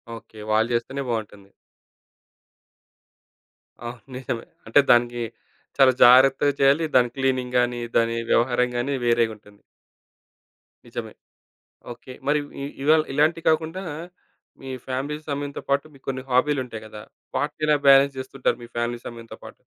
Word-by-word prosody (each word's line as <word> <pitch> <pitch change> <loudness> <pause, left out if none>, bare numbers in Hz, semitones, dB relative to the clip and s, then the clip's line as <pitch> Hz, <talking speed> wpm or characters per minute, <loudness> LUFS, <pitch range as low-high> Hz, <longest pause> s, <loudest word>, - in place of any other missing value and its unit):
Okay. 110 -1 -13
వాళ్ళు 110 +2 +2
జేస్తేనే 130 +4 -2
బావుంటుంది. 105 -3 -5 2.4
అవును 120 -1 -7
నిజమే. 125 -2 -4 0.2
అంటే 115 - +5
దానికి, 120 0 +3 0.6
చాలా 130 -2 +6
జాగ్రత్తగా 135 +3 +6
చేయాలి. 140 +4 +4
దాని 125 -1 +5
క్లీనింగ్ 130 -2 -1
గాని, 120 0 0 0.2
దాని 115 0 +1
వ్యవహారం 125 +1 +2
గాని 135 +3 -1
వేరేగుంటుంది. 110 -3 -1 1.3
నిజమే. - - -7 0.8
ఓకే. 130 +2 -12 0.2
మరి 150 +1 +3 0.2
ఇ - - -3 0.2
ఇవాళ 155 +2 +5
ఇలాంటియి 160 +4 +1
కాకుండా, 160 +4 -1 0.8
మీ 135 0 -8 0.2
ఫ్యామిలీ 135 +4 -3
సమయంతో 145 0 -4
పాటు 140 +1 +2
మీ - - -16
కొన్ని 130 -1 -3
హాబీలుంటాయి 125 -4 0
గదా! 105 0 -10 0.3
వాట్ని 150 +1 -2
ఎలా 150 - +5
బ్యాలెన్స్ 135 0 +6
జేస్తుంటారు 130 0 -2
మీ 120 - -12
ఫ్యామిలీ 120 0 -1
సమయంతో 115 -1 -9
పాటు? - - -12
130 Hz, 125 wpm, -23 LUFS, 120-140 Hz, 2.4 s, చాలా